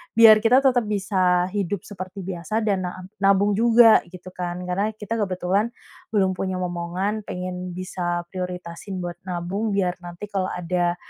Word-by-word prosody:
biar 225 Hz, -2 st, +9 dB
kita 245 Hz, +3 st, +6 dB
tetap 250 Hz, -4 st, +3 dB
bisa 185 Hz, -3 st, +1 dB
hidup 200 Hz, -2 st, -2 dB
seperti 185 Hz, -1 st, -7 dB
biasa 180 Hz, +3 st, -3 dB
dan 200 Hz, -3 st, +1 dB
na -, -, -4 dB, 0.3 s
nabung 200 Hz, +1 st, +4 dB
juga, 230 Hz, +1 st, +7 dB
gitu 180 Hz, +1 st, -11 dB
kan. 180 Hz, 0 st, -4 dB
Karena 200 Hz, +4 st, 0 dB
kita 215 Hz, +1 st, -4 dB
kebetulan 195 Hz, +2 st, 0 dB, 0.4 s
belum 195 Hz, -3 st, +3 dB
punya 185 Hz, 0 st, -2 dB
momongan, 180 Hz, +4 st, -2 dB
pengen 180 Hz, 0 st, -5 dB
bisa 175 Hz, -1 st, -3 dB
prioritasin 180 Hz, 0 st, -5 dB
buat 175 Hz, -1 st, -5 dB
nabung, 185 Hz, +5 st, -2 dB
biar 180 Hz, -2 st, 0 dB
nanti 175 Hz, +2 st, -9 dB
kalo 190 Hz, -2 st, 0 dB
ada, 175 Hz, 0 st, 0 dB
185 Hz, 150 wpm, -23 LUFS, 180-205 Hz, 0.4 s, biar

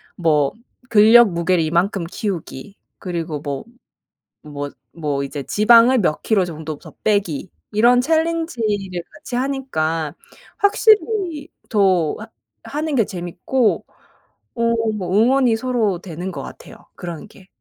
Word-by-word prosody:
뭐 150 Hz, -5 st, +2 dB, 0.4 s
근력 225 Hz, +1 st, +7 dB
무게를 170 Hz, 0 st, +1 dB
이만큼 170 Hz, +3 st, 0 dB
키우기 185 Hz, -, -5 dB, 0.2 s
그리고 165 Hz, -4 st, -4 dB
뭐 140 Hz, -2 st, -5 dB, 0.8 s
뭐 145 Hz, -1 st, -6 dB, 0.2 s
뭐 145 Hz, -4 st, -2 dB
이제 140 Hz, 0 st, -5 dB
지방을 235 Hz, -, +5 dB
몇 165 Hz, -6 st, 0 dB
킬로 200 Hz, -5 st, +2 dB
정도 160 Hz, -2 st, -6 dB
더 -, -, -14 dB
빼기 195 Hz, -6 st, 0 dB, 0.2 s
이런 240 Hz, +4 st, +4 dB
챌린지를 250 Hz, -, -1 dB
같이하니까 245 Hz, -, -2 dB, 0.4 s
확실히 405 Hz, -7 st, +2 dB, 0.2 s
더 190 Hz, -7 st, +2 dB
하 215 Hz, -, -9 dB, 0.4 s
하는 300 Hz, 0 st, -3 dB
게 225 Hz, -6 st, +3 dB
재밌고 185 Hz, +7 st, -1 dB, 0.7 s
어 230 Hz, 0 st, +1 dB, 0.2 s
뭐 185 Hz, -2 st, -3 dB
응원이 250 Hz, 0 st, +4 dB
서로 225 Hz, -7 st, 0 dB
되는 180 Hz, +1 st, -6 dB
것 140 Hz, -5 st, -6 dB
같아요 -, -, -11 dB, 0.2 s
그런 175 Hz, +2 st, -7 dB
게. 190 Hz, -2 st, -18 dB
195 Hz, 235 characters per minute, -20 LUFS, 165-245 Hz, 0.8 s, 근력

